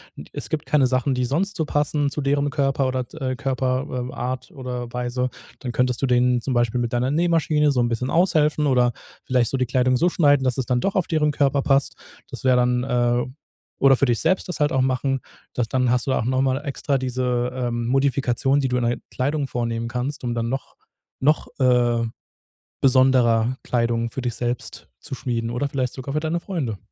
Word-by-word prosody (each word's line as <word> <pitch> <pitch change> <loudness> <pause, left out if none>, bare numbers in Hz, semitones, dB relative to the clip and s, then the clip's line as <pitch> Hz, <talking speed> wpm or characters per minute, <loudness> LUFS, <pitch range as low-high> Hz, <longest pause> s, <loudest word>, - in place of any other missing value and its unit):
d - - -9
es - - -6
gibt 155 0 -2
keine 140 -4 +3
Sachen, 130 +1 +1
die 125 0 0
sonst 180 +11 -1
so 160 - +1
passen 145 0 0
zu 145 - -4
derem 140 +1 +1
Körper 135 -1 0
oder, 130 -1 -1 0.2
äh, 130 -1 -1
Körper 130 -2 -2
äh, - - -9
Art 130 +1 -4
oder 125 -3 -6
Weise, 125 +1 -1 0.3
dann 125 - -4
könntest 125 0 0
du 135 - +2
denen 125 0 +3
zum 130 +1 -2
Beispiel 120 0 +1
mit 120 -1 -2
deiner 125 +2 0
Nähmaschine 160 -2 +2
so 130 - 0
'n 120 - +2
bisschen 120 +2 -2
aushelfen 155 -4 +2
oder 125 -3 +3 0.3
vielleicht 125 -2 +1
so 135 - 0
die 130 -1 0
Kleidung 130 +1 +2
so 175 +7 +3
schneiden, 145 -5 +3
dass 130 -1 0
es 130 - -1
dann 125 -1 0
doch 195 - -1
auf 185 -4 +2
deren 155 -2 +1
Körper 140 -1 +1
passt. 135 0 +1 0.4
Das - - -7
wäre 130 -1 +4
dann, 125 0 +2
äh 120 -1 +1 0.5
oder 135 -1 +5
für 140 - +3
dich 120 -3 +1
selbst 185 +4 +1
das 180 -3 -5
halt 150 - +3
auch 130 - +1
machen. 130 +1 0 0.3
Das 120 -2 -1
dann 125 +1 +1
hast 125 +1 +1
du 135 - +2
auch - - 0
noch 130 +2 +1
mal 130 -1 +1
extra 140 -1 -1
diese, 125 -1 -1
ähm, 120 -2 -2
Modifikation, 135 +1 +1
die 135 - 0
du 125 - 0
in 125 - 0
der 120 +1 0
Kleidung 140 +3 -1
vornehmen 115 -2 -2
kannst, 130 +4 -3
um 120 -1 -1
dann 115 -1 -2
noch 135 +3 -4 0.4
noch, 150 +3 +2
äh, 120 -2 +3 0.8
besonderer 130 -2 +4
Kleidung 115 -1 0
für 135 - -4
dich 120 -2 -3
selbst 120 0 -4
zu - - -6
schmieden 115 -3 -2
oder 120 +4 -1
vielleicht 130 -3 -2
sogar 135 +1 -6
für 150 - +1
deine 160 +2 -1
Freunde. 155 - -3
130 Hz, 210 wpm, -23 LUFS, 125-140 Hz, 0.8 s, oder